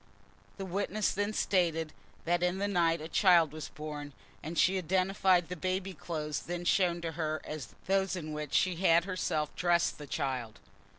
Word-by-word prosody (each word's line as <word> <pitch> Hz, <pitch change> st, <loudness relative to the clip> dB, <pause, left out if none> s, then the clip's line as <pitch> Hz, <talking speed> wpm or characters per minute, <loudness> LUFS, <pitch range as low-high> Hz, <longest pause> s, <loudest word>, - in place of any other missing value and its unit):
The 195 Hz, -, -4 dB
witness 200 Hz, +2 st, -1 dB
then 205 Hz, +1 st, -1 dB
stated 165 Hz, -7 st, +1 dB, 0.3 s
that 175 Hz, +1 st, +1 dB
in 180 Hz, +1 st, +1 dB
the 200 Hz, +1 st, 0 dB
night 170 Hz, -4 st, +2 dB
a 155 Hz, -, -5 dB
child 170 Hz, -4 st, +5 dB
was 155 Hz, -1 st, -7 dB
born, 150 Hz, -1 st, -7 dB, 0.3 s
and 165 Hz, +3 st, -6 dB
she 190 Hz, +4 st, +4 dB
identified 185 Hz, 0 st, +2 dB
the 180 Hz, -, -5 dB
baby 185 Hz, +2 st, -2 dB
clothes 150 Hz, -2 st, -4 dB
then 175 Hz, 0 st, -5 dB
shown 175 Hz, -2 st, +2 dB
to 165 Hz, -1 st, -3 dB
her 155 Hz, -1 st, -2 dB
as 150 Hz, -5 st, -7 dB
those 195 Hz, 0 st, +1 dB
in 155 Hz, -4 st, -5 dB
which 150 Hz, -2 st, -4 dB
she 185 Hz, -3 st, +2 dB
had 170 Hz, -1 st, +4 dB
herself 160 Hz, -5 st, -2 dB
dressed 175 Hz, -2 st, +1 dB
the 145 Hz, -, -8 dB
child. 125 Hz, -6 st, -3 dB
170 Hz, 175 wpm, -31 LUFS, 155-185 Hz, 0.3 s, child